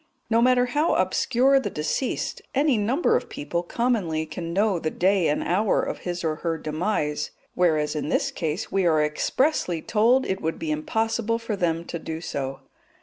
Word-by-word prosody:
No 230 +1 +4
matter 250 0 +4
how 295 +6 +1
obscure 265 +2 +3
the 240 - -3
deceased, 165 - -2
any 280 -1 +3
number 235 +10 +2
of - - -1
people 175 -12 -3
commonly 180 -6 0
can 165 +1 -6
know 200 0 +2
the 160 - -1
day 185 +1 +2
and 150 - 0
hour 195 +4 +2
of - - -4
his 175 -1 -4
or 155 -1 -1
her 165 0 -2
demise, 155 -1 -2 0.2
whereas 155 -4 +1
in 150 - -2
this - - +1
case 160 +4 -3
we 195 -2 +2
are 155 -2 +3
expressly 175 - 0
told 235 +9 +3
it 190 0 -2
would 160 +1 -2
be 155 - -3
impossible 225 +8 0
for 230 -2 -3
them 170 -3 -1
to 170 - -5
do 160 0 -5
so. 135 -5 -4
180 Hz, 180 wpm, -25 LUFS, 160-230 Hz, 0.2 s, No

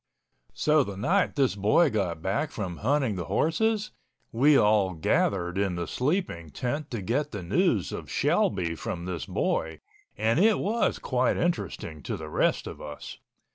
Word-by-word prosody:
So 150 -1 +3
the 100 -5 -7
night 180 - +1
this 135 -6 +2
boy 110 - +3
got 90 -7 -2
back 110 +11 0
from 95 - -5
hunting 130 -3 0
the 85 - -3
horses, 215 - 0 0.4
we 140 +5 +5
all 105 -3 +3
gathered 90 +3 0
in 95 -3 0
the 85 0 -3
sleeping 130 - -2
tent 145 - -3
to 115 -5 -4
get 140 +9 0
the 100 -7 -6
news 85 - +1
of - - -6
Shelby 90 -4 +1
from 85 +1 -5
this 85 -7 -4
boy, 80 -1 -1 0.4
and 110 +7 +2
it 215 +2 +5
was 220 +4 0
quite 125 -1 0
interesting 100 - -2
to - - -4
the 80 -1 -7
rest - - +1
of - - -8
us. 75 -1 -8
105 Hz, 165 wpm, -27 LUFS, 90-150 Hz, 0.4 s, we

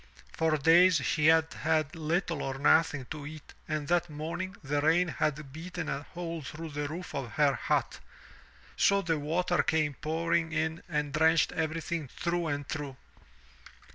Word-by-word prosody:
For 160 -1 +1
days 170 +5 +6
she 150 +1 +2
had 160 0 +4
had 155 +1 0
little 165 0 -1
or 135 0 -3
nothing 145 -1 +3
to 145 -2 -5
eat 155 -1 -11
and 155 -2 -2
that 175 0 +1
morning 170 +6 -5
the 145 +1 0
rain 165 +4 +3
had 150 0 -2
beaten 175 +1 -5
a 140 - -2
hole 170 +1 -6
through 155 +3 -7
the 145 0 -3
roof 170 +5 -7
of 135 -4 -4
her 145 -2 +3
hut, 120 - -1 0.8
so 200 0 +3
the 165 -2 0
water 175 +4 +1
came 155 -3 +1
pouring 165 +3 -1
in 160 +1 -1
and 150 -3 -1
drenched 160 +1 +4
everything 160 -1 -2
through 170 +5 -2
and 145 -2 -3
through. 145 -4 -5
160 Hz, 160 wpm, -30 LUFS, 145-170 Hz, 0.8 s, days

